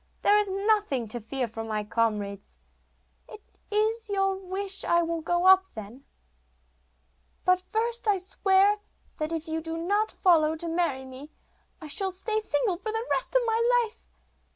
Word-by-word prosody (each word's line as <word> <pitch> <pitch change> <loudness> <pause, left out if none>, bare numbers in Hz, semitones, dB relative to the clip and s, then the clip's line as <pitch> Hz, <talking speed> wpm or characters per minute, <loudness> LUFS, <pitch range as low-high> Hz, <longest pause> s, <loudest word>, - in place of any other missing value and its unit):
There 415 +1 +5
is 415 -1 -1
nothing 395 - +1
to 240 +2 -5
fear 250 +3 -2
from 225 0 -7
my 215 -1 -2
comrades.' 210 -2 -2 0.7
'If 440 -3 -10
it - - -37 0.2
is 440 +1 +1
your 390 -1 +1
wish 385 +1 -3
I 340 0 +3
will 335 0 -2
go 350 +2 0
up 380 0 +7
then; 220 +5 -9 1.4
but 365 0 +4
first 465 +1 -1
I 410 -2 +4
swear 385 +2 +3 0.4
that 310 0 -3
if 325 -1 -4
you 320 0 -2
do 325 0 -5
not 405 +6 0
follow 320 -4 +3
to 335 +2 -6
marry 325 -6 -1
me, 260 +3 -10 0.5
I 325 - -10
shall 380 +6 0
stay 430 +4 -2
single 355 -1 0
for 435 +4 -4
the 445 +1 -3
rest - - -1
of - - +4
my 470 +2 +3
life. 445 - -16
365 Hz, 170 wpm, -27 LUFS, 300-420 Hz, 1.4 s, up